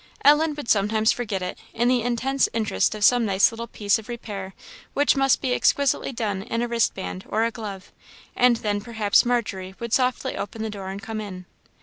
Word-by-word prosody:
Ellen 300 +1 +5
would 290 -5 -7
sometimes 215 +1 +3
forget 205 -6 -3
it, 180 - -5 0.2
in 240 +1 +2
the 250 -1 +3
intense 245 +3 0
interest 215 - 0
of 210 - -4
some 245 +3 +5
nice 195 -2 +3
little 230 +1 -6
piece 210 0 +1
of 220 - -13
repair 200 -5 -6 0.4
which 285 +1 +3
must 270 -1 +3
be 255 -2 0
exquisitely 280 0 +2
done 215 -6 -2
in 230 +3 -2
a - - -1
wrist 235 -1 +1
band 190 0 -6
or 220 +1 +1
a 230 - -1
glove; 205 -5 -8 0.4
and 245 -1 +5
then 205 -1 0
perhaps 220 -1 +2
Margery 195 -6 -2
would 235 -1 -5
softly 255 +1 +1
open 220 +2 -5
the 220 - -3
door 195 -2 -6
and 195 +1 -5
come 220 -1 -4
in. 185 -3 -8
225 Hz, 205 wpm, -24 LUFS, 200-245 Hz, 0.4 s, Ellen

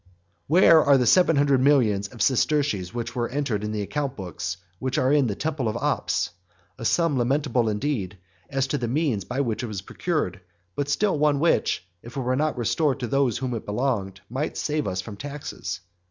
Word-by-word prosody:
XXXVII. 90 -1 -35
Where 165 0 +6
are 140 -1 +5
the 125 - +2
seven 170 +6 +5
hundred 140 -2 +3
millions 115 -8 +3
of 115 - -3
sesterces 130 -8 +1
which 120 +1 -5
were 120 -1 -1
entered 125 -6 -1
in 105 - -2
the 105 -1 -2
account 140 +5 -3
books 90 -2 -5 0.2
which 130 0 -2
are 130 +2 +3
in 145 -4 +4
the 105 - -2
temple 140 -2 -2
of 110 - -1
Ops? - - 0 0.5
a 115 - -5
sum 165 0 +2
lamentable 125 -2 +1
indeed, 105 -4 -2 0.3
as 135 -1 0
to 140 +2 -2
the 120 - -2
means 125 - 0
by 130 +3 -1
which 115 -4 -1
it 120 - -3
was 100 -4 -5
procured, 125 - -2 0.3
but 145 0 -2
still 190 +2 +1
one 150 -1 +3
which, 160 - +1 0.2
if 120 +3 -10
it - - 0
were 130 0 0
not 150 0 0
restored 135 +4 +1
to 120 - -1
those 135 -2 +1
to - - -4
whom 130 -2 -2
it 115 - -4
belonged, 105 -4 -1
might 135 +6 -3
save 150 -1 -1
us 95 -1 -2
from 100 +1 -9
taxes. 140 - -6
130 Hz, 210 wpm, -25 LUFS, 105-145 Hz, 0.5 s, Where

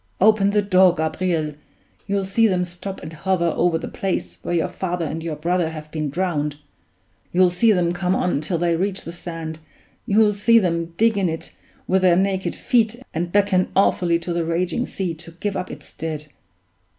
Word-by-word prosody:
Open 205 0 +5
the 205 0 +2
door, 185 -2 +5
Gabriel! 160 -1 -1 0.5
You'll 200 -1 0
see 225 +4 +3
them 180 -3 +1
stop 180 +2 -7
and 160 - -7
hover 170 0 0
over 170 -1 +2
the 160 - -6
place 195 -2 -3
where 175 - -2
your 165 - +1
father 180 -2 -3
and 160 +1 -4
your 160 -1 -3
brother 170 +2 0
have 155 -1 -9
been 155 -2 -2
drowned; 150 -3 -1 0.8
you'll 180 0 +4
see 220 +6 +4
them 175 -4 +2
come 180 +1 0
on 175 -5 0
till 165 +3 -1
they 170 0 +1
reach 190 +3 -2
the 170 - -7
sand, 165 -2 -6 0.5
you'll 210 +1 +4
see 230 +3 +4
them 170 -4 0
dig 225 -2 +3
in 185 -3 +1
it 160 0 -6 0.3
with 190 0 +2
their 180 -2 +5
naked 190 0 0
feet 230 -3 +2 0.2
and 175 +2 -2
beckon 200 -2 +2
awfully 175 -3 +3
to 170 +1 -4
the 170 0 0
raging 175 +8 -1
sea 185 -4 -3
to 165 +1 -12
give 200 +4 -3
up 185 -1 -3
its - - -10
dead. 155 -2 -4
180 Hz, 190 wpm, -22 LUFS, 165-195 Hz, 0.8 s, Open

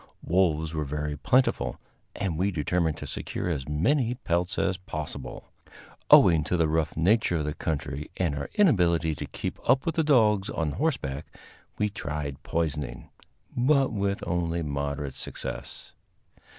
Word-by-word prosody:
Wolves 80 -3 +1
were 75 -1 -1
very 75 +1 -3
plentiful, 75 - +1 0.4
and 95 -5 -2
we 95 +5 +1
determined 85 -2 0
to - - -7
secure - - -4
as 75 -5 -3
many 120 - +2
pelts 90 -5 -1
as 95 -1 +1
possible. 75 -7 -6 0.6
Owing 80 -3 +7
to 90 +4 0
the 80 -2 +3
rough 80 0 0
nature 95 +3 +3
of 75 -2 -1
the 75 - -2
country 75 -2 -3
and 85 -5 +1
our 70 -1 -4
inability 85 - +3
to - - -6
keep - - -5
up 130 +1 +4
with 165 - 0
the 160 - +1
dogs 110 -9 +4
on 80 -3 -1
horseback, 80 - -2 0.5
we 105 - +2
tried 75 -8 -4
poisoning, 80 -2 -3 0.4
but 135 +1 +3
with 100 -1 -1
only 85 -1 -1
moderate 70 -1 -3
success. 65 - -6
85 Hz, 150 wpm, -27 LUFS, 75-100 Hz, 0.6 s, Owing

